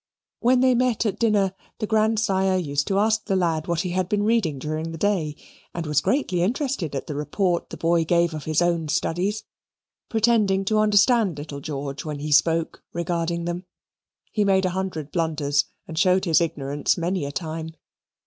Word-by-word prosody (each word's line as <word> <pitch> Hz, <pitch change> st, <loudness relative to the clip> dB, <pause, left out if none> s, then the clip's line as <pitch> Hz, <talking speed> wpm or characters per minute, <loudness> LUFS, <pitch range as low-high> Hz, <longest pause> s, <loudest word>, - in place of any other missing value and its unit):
When 250 Hz, +1 st, +3 dB
they 260 Hz, -1 st, +5 dB
met 245 Hz, -2 st, +1 dB
at 210 Hz, -, -1 dB
dinner 205 Hz, -4 st, +2 dB, 0.2 s
the 215 Hz, -, -2 dB
grandsire 215 Hz, -3 st, +2 dB
used 145 Hz, -5 st, -1 dB
to 195 Hz, -, +1 dB
ask 220 Hz, +2 st, +2 dB
the 195 Hz, -, 0 dB
lad 165 Hz, -4 st, 0 dB
what 170 Hz, -1 st, 0 dB
he 180 Hz, -, -3 dB
had 185 Hz, 0 st, -1 dB
been 205 Hz, -1 st, +1 dB
reading 210 Hz, -10 st, +1 dB
during 155 Hz, +4 st, -4 dB
the 165 Hz, -, -6 dB
day, 165 Hz, -5 st, 0 dB, 0.4 s
and 170 Hz, -1 st, -3 dB
was 150 Hz, -1 st, +2 dB
greatly 190 Hz, -, 0 dB
interested 220 Hz, -, -1 dB
at 135 Hz, -, -3 dB
the 150 Hz, -, -5 dB
report 170 Hz, +5 st, -1 dB
the -, -, -8 dB
boy 165 Hz, 0 st, +2 dB
gave 170 Hz, 0 st, +2 dB
of 155 Hz, -2 st, -6 dB
his 155 Hz, +2 st, +2 dB
own 170 Hz, -2 st, 0 dB
studies, 180 Hz, +7 st, -1 dB, 0.7 s
pretending 215 Hz, -4 st, +2 dB
to 215 Hz, +1 st, +2 dB
understand 210 Hz, -, +3 dB
little 145 Hz, -1 st, -6 dB
George 140 Hz, -1 st, -5 dB
when 155 Hz, -3 st, -4 dB
he 150 Hz, +1 st, -5 dB
spoke 165 Hz, +3 st, +2 dB
regarding 170 Hz, 0 st, -2 dB
them. 175 Hz, +2 st, -4 dB, 0.7 s
He 210 Hz, -, +1 dB
made 190 Hz, -1 st, +3 dB
a 185 Hz, -, 0 dB
hundred 180 Hz, -5 st, -4 dB
blunders 150 Hz, -4 st, 0 dB, 0.2 s
and 160 Hz, -1 st, -4 dB
showed 185 Hz, +1 st, +3 dB
his 165 Hz, -1 st, +4 dB
ignorance 145 Hz, -3 st, -1 dB
many 175 Hz, 0 st, -1 dB
a 140 Hz, -, -3 dB
time. 160 Hz, 0 st, -5 dB
175 Hz, 185 wpm, -24 LUFS, 155-205 Hz, 0.7 s, they